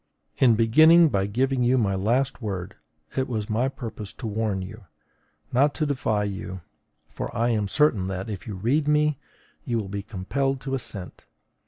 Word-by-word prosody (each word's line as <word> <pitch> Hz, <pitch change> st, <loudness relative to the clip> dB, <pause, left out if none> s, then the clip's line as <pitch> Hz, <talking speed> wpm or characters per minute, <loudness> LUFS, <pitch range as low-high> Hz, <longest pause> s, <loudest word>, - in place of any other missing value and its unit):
In 120 Hz, -4 st, +6 dB
beginning 155 Hz, +9 st, +6 dB
by 100 Hz, -6 st, 0 dB
giving 130 Hz, +4 st, 0 dB
you 125 Hz, +2 st, +3 dB
my 105 Hz, -5 st, +1 dB
last 120 Hz, +8 st, 0 dB
word, 95 Hz, -5 st, -4 dB, 0.4 s
it 130 Hz, -, 0 dB
was 110 Hz, -3 st, -3 dB
my 120 Hz, +5 st, +1 dB
purpose 110 Hz, -5 st, -7 dB
to 120 Hz, -, -9 dB
warn 105 Hz, -3 st, -1 dB
you, 110 Hz, +2 st, -10 dB, 0.7 s
not 140 Hz, +4 st, +3 dB
to 155 Hz, -, 0 dB
defy 120 Hz, -7 st, 0 dB
you; 95 Hz, -2 st, -5 dB, 0.5 s
for -, -, -5 dB
I 120 Hz, +1 st, +2 dB
am 105 Hz, -3 st, 0 dB
certain 120 Hz, -7 st, +2 dB
that, 95 Hz, +1 st, -4 dB
if 105 Hz, -2 st, -6 dB
you 105 Hz, -, -5 dB
read 130 Hz, +10 st, +1 dB
me, 150 Hz, -1 st, +2 dB, 0.4 s
you 120 Hz, -, -1 dB
will 105 Hz, -4 st, -3 dB
be 100 Hz, 0 st, -3 dB
compelled 125 Hz, +7 st, -2 dB
to 135 Hz, -1 st, -4 dB
assent. 115 Hz, -8 st, -5 dB
115 Hz, 175 wpm, -25 LUFS, 100-135 Hz, 0.7 s, In